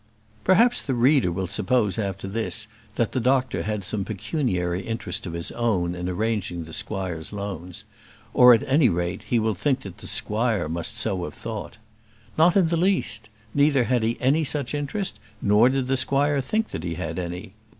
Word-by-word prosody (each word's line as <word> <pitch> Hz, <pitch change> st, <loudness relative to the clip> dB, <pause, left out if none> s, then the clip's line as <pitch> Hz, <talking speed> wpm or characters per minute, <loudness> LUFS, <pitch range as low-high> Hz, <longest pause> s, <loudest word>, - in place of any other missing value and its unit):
Perhaps 235 Hz, +7 st, +4 dB
the 135 Hz, -, -2 dB
reader 125 Hz, -, +4 dB
will 95 Hz, +2 st, -2 dB
suppose 105 Hz, +3 st, 0 dB
after 95 Hz, -2 st, -3 dB
this 110 Hz, +1 st, -2 dB, 0.3 s
that 115 Hz, -, 0 dB
the 130 Hz, -, -1 dB
doctor 130 Hz, +2 st, +1 dB
had 105 Hz, -1 st, -3 dB
some 100 Hz, +1 st, -2 dB
pecuniary 95 Hz, -, -1 dB
interest 110 Hz, -1 st, -3 dB
of 85 Hz, -, -5 dB
his 85 Hz, -1 st, -3 dB
own 95 Hz, -8 st, 0 dB
in 90 Hz, 0 st, -4 dB
arranging 95 Hz, -3 st, -1 dB
the 80 Hz, 0 st, -10 dB
squire's 90 Hz, -6 st, -4 dB
loans; 95 Hz, -4 st, -6 dB, 0.5 s
or, 125 Hz, 0 st, +8 dB
at 125 Hz, +4 st, +4 dB
any 135 Hz, -1 st, +4 dB
rate, 85 Hz, -1 st, -2 dB
he 120 Hz, -, +3 dB
will 110 Hz, -1 st, +1 dB
think 135 Hz, +3 st, 0 dB
that 95 Hz, -2 st, -9 dB
the -, -, -8 dB
squire 110 Hz, -4 st, 0 dB
must 85 Hz, +6 st, -2 dB
have -, -, -8 dB
so 95 Hz, -6 st, 0 dB
thought. 110 Hz, -3 st, -7 dB, 0.6 s
Not 170 Hz, +4 st, +5 dB
in 180 Hz, -4 st, +4 dB
the 170 Hz, -, +1 dB
least; 165 Hz, -, 0 dB, 0.2 s
neither 145 Hz, -2 st, +4 dB
had 125 Hz, 0 st, +1 dB
he 115 Hz, +1 st, 0 dB
any 145 Hz, +5 st, +3 dB
such 145 Hz, -2 st, -1 dB
interest, 150 Hz, +7 st, -3 dB, 0.2 s
nor 105 Hz, +4 st, +5 dB
did 135 Hz, -1 st, 0 dB
the 135 Hz, +1 st, +1 dB
squire 140 Hz, +2 st, +2 dB
think 220 Hz, +11 st, -1 dB
that -, -, -5 dB
he 85 Hz, -1 st, -3 dB
had 80 Hz, -1 st, -4 dB
any. 90 Hz, +3 st, -6 dB
110 Hz, 185 wpm, -24 LUFS, 95-135 Hz, 0.6 s, or